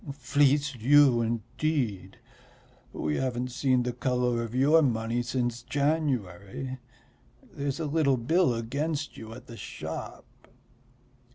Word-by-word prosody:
"Fleece 140 +2 +2
you, 130 0 +5
indeed! 115 -1 -2 0.7
We 75 -1 -2
haven't 125 -1 -2
seen 130 -1 +2
the 125 0 -2
colour 125 -2 0
of 115 +1 -5
your 145 +5 +5
money 115 -3 0
since 120 -1 -2
January. 130 - -2 0.7
There's 140 +1 -3
a 160 - -2
little 145 -3 +2
bill 145 +3 +2
against 145 +6 -3
you 110 0 -9
at 125 +2 -11
the 115 -2 -10
shop." - - -7
130 Hz, 115 wpm, -28 LUFS, 115-145 Hz, 0.7 s, you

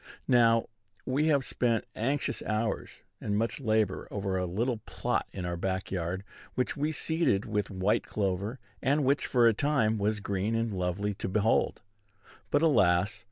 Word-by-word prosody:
Now, 115 -2 +5 0.4
we 140 +4 +1
have 140 -4 +3
spent 115 -3 0
anxious 135 +6 -1
hours 110 +1 -2 0.2
and 105 -1 -1
much 115 +5 -1
labor 110 -4 0
over 100 -2 -2
a 90 -1 0
little 115 +7 -1
plot - - -1
in 90 -2 -5
our 85 0 -2
back 95 +2 -2
yard, 90 +1 -2 0.3
which 125 - 0
we 150 +1 0
seeded 160 - +1
with 105 -2 -1
white 95 +2 0
clover, 100 +3 -1 0.2
and 140 +2 +2
which, 140 +2 +2
for 120 -2 +4
a 115 - +5
time, 110 -4 +1
was 105 +1 0
green 100 +2 -1
and 115 -1 -1
lovely 95 +3 -1
to 95 - -4
behold; 105 +2 +1 0.7
but, 145 +2 +2
alas! 95 - +3
110 Hz, 160 wpm, -29 LUFS, 95-125 Hz, 0.7 s, Now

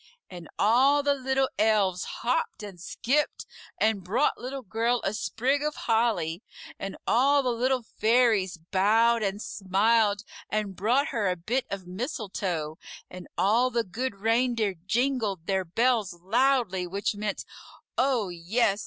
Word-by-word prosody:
And 175 -3 -10
all 265 +7 +4
the 285 0 +3
Little 265 0 0
Elves 205 -4 +2
hopped 240 -2 -2
and 195 -4 -9
skipped 280 +10 -1 0.3
and 215 -3 +1
brought 235 +11 +1
Little 260 +2 -6
Girl 230 +4 0
a 195 - -1
sprig 260 +6 0
of 300 0 -2
holly; 220 -7 0 0.4
and 195 0 -5
all 275 +4 +3
the 250 - +1
Little 250 +1 0
Fairies 220 -5 +2
bowed 215 +7 +2
and 200 -1 -1
smiled 205 +1 +1 0.3
and 210 -2 -2
brought 250 - +1
her 215 -7 0
a 180 - 0
bit 235 +10 -2
of 195 -2 -5
mistletoe; 185 - -4 0.3
and 180 -1 -9
all 230 +6 +3
the 235 -2 0
Good 225 +4 -4
Reindeer 225 0 +1
jingled 225 -6 0
their 190 0 0
bells 225 +1 +1
loudly, 200 0 +1
which 200 +4 -2
meant, 205 0 -4 0.5
"Oh, 250 -6 +1
yes! 195 +5 0
220 Hz, 140 wpm, -27 LUFS, 195-250 Hz, 0.5 s, all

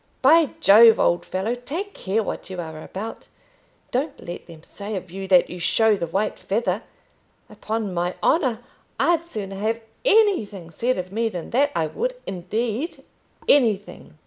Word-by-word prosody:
"By 325 -3 +6
Jove, 225 +3 +8
old 175 - +2
fellow, 190 +5 -1
take 320 +12 -5
care 210 +4 -1
what - - -5
you're 165 -4 -6
about. 210 +7 -7 0.6
Don't 275 +3 -2
let 175 - -8
them 165 -2 -13
say 205 +3 -7
of 185 -2 -6
you 195 +1 -6
that 180 -2 +4
you 180 - -7
show 220 +5 +3
the 170 -4 -3
white 195 +6 -1
feather. 200 -1 -1 0.7
Upon 215 -3 -3
my 175 +1 -1
honour, 260 -8 +2 0.4
I'd 340 -1 +2
sooner 195 - -6
have 220 +3 -1 0.2
anything 360 - +2
said 245 +9 0
of 185 0 -5
me 225 +2 0
than 180 -5 -7
that. 285 +4 +3
I 160 - +1
would, - - -2
indeed, 220 - -3 0.4
anything." 210 - +1
215 Hz, 155 wpm, -23 LUFS, 185-245 Hz, 0.7 s, Jove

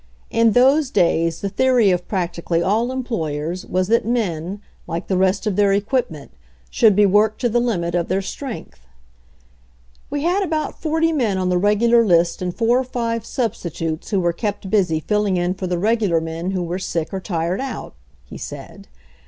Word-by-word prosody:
In 230 -1 +3
those 270 +4 +4
days 165 - +1
the 200 - -2
theory 250 -3 +3
of 180 0 -1
practically 175 -3 -1
all 225 +6 +1
employers 175 - -3
was 185 0 0
that 230 +1 +3
men, 200 -5 -2 0.3
like 170 +2 -4
the 190 - -1
rest 190 +3 +1
of 210 -3 0
their 200 -1 +3
equipment, 200 - -2 0.4
should 215 -4 +4
be 205 +1 +5
worked 210 +2 +3
to 240 - +2
the 240 +2 +2
limit 180 -9 -1
of 175 -1 0
their 190 +2 0
strength. 220 - -7 1.3
"We 290 0 -3
had 360 +4 +2
about 315 -5 -2
forty 325 +1 +1
men 230 -10 0
on 185 -1 0
the 180 0 +2
regular 230 +4 +4
list 175 -4 +2
and 180 -1 -1
four 235 +6 +2
or - - 0
five 230 -3 -3
substitutes 170 - -3
who 200 - +1
were 175 -1 +1
kept 200 0 -4
busy 180 -7 +2
filling 210 0 0
in 175 +1 0
for 185 0 -5
the 180 0 -1
regular 205 -3 +1
men 165 +2 -4
who 185 -2 -1
were 175 +2 -3
sick 170 -2 -3
or 190 - -2
tired 175 +1 -2
out," 265 -4 -6 0.3
he - - -10
said. - - -9
195 Hz, 185 wpm, -20 LUFS, 175-235 Hz, 1.3 s, be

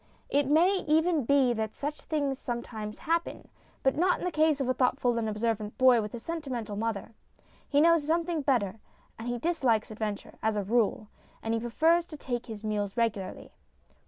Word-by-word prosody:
It 285 -1 +2
may 345 +7 +4
even 320 -2 +3
be 270 -2 +4
that 220 -1 -3
such 295 +1 -4
things 285 -4 -1
some 240 -1 -3
times 215 -2 -7
happen. 335 +1 -2 0.3
But 265 - +3
not 360 +3 +3
in - - -5
the 360 - 0
case 310 -2 +3
of 270 - -1
a 255 - +2
thoughtful 250 -1 +1
and 220 -1 -1
observant 215 -1 -2
boy 255 -3 +6
with 210 +2 -5
a - - -6
sentimental 255 -8 -4
mother. 225 0 -3 0.6
He 290 0 +4
knows 335 -2 +4
something 335 0 0
better, 230 -7 0 0.4
and 225 - -6
he 245 0 -1
dislikes 245 -8 +1
adventure, 210 -1 -5
as 220 0 +1
a 205 - 0
rule, 215 0 +1 0.4
and 225 - -1
he 230 - +1
prefers 320 +9 +2
to 305 - -9
take 245 -4 -4
his 220 -2 -8
meals 210 -1 -2
regularly. 215 -5 -2
245 Hz, 190 wpm, -29 LUFS, 220-305 Hz, 0.6 s, boy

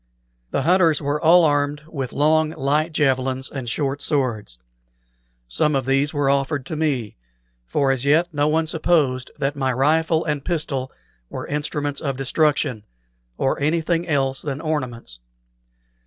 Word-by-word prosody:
The - - -1
hunters 170 -2 +4
were 145 0 -2
all 170 +1 +6
armed 145 0 0
with 135 -6 -5
long, 155 +2 +2
light 150 +4 +1
javelins 130 -3 0
and 130 -4 -5
short 140 +2 -2
swords. 120 - -1 0.9
Some 100 - +1
of 135 -2 0
these 135 +2 +2
were 145 -2 0
offered 140 0 0
to 160 - -5
me, 140 -9 -1 0.5
for 135 - +1
as 135 -2 0
yet 155 +5 +3
no 145 0 +1
one 160 +1 +2
supposed 155 -5 +1
that 140 0 -1
my 135 -2 0
rifle 160 +5 +2
and 150 -3 -2
pistol 145 -6 -2 0.4
were - - -6
instruments 145 -1 -3
of 135 -3 -2
destruction, 135 -4 0 0.5
or 135 - 0
anything 165 +3 0
else 135 -3 0
than 140 -2 -4
ornaments. 130 - -4
145 Hz, 145 wpm, -22 LUFS, 135-155 Hz, 0.9 s, all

